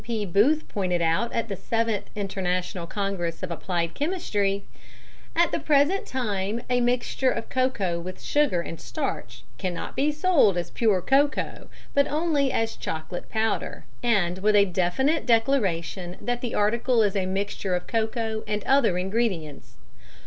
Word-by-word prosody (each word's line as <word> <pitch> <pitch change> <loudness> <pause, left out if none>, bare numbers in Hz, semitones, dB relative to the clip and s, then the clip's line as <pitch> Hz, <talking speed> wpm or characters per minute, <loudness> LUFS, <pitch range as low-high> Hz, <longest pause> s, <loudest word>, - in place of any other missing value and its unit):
P. 225 -3 -2
Booth 225 - +3
pointed 180 -4 -1
out 165 +9 +1
at 230 -1 -1
the 200 - -3
Seventh 225 +1 -1
International 185 -3 -2
Congress 185 -4 -3
of 180 - -3
Applied 170 0 -2
Chemistry: 205 - -1 0.7
"At 340 +1 +4
the - - 0
present 300 +6 +2
time 210 -4 -2
a 245 0 +3
mixture 245 +2 +1
of 230 -2 -3
cocoa 220 -10 0
with 185 +2 -7
sugar 290 -12 +1
and 165 -1 -7
starch 120 0 -4 0.2
cannot 180 -2 -4
be 290 +2 +2
sold 300 - +3
as 175 -1 -3
pure 205 -6 +2
cocoa, 280 +2 +1 0.2
but 280 0 +4
only 295 -3 +1
as 225 -2 -1
'chocolate 160 +2 -5
powder,' 220 0 -1 0.2
and 195 -7 +1
with 210 +2 +3
a 200 -1 +6
definite 190 - +1
declaration 195 -8 +1
that 245 0 -2
the 240 - -3
article 230 +3 +2
is 205 -1 +1
a 190 -2 0
mixture 195 -1 -1
of 180 - -3
cocoa 220 -1 -1
and 210 -1 -2
other 265 -9 +3
ingredients. 180 - -2
210 Hz, 150 wpm, -26 LUFS, 180-245 Hz, 0.7 s, a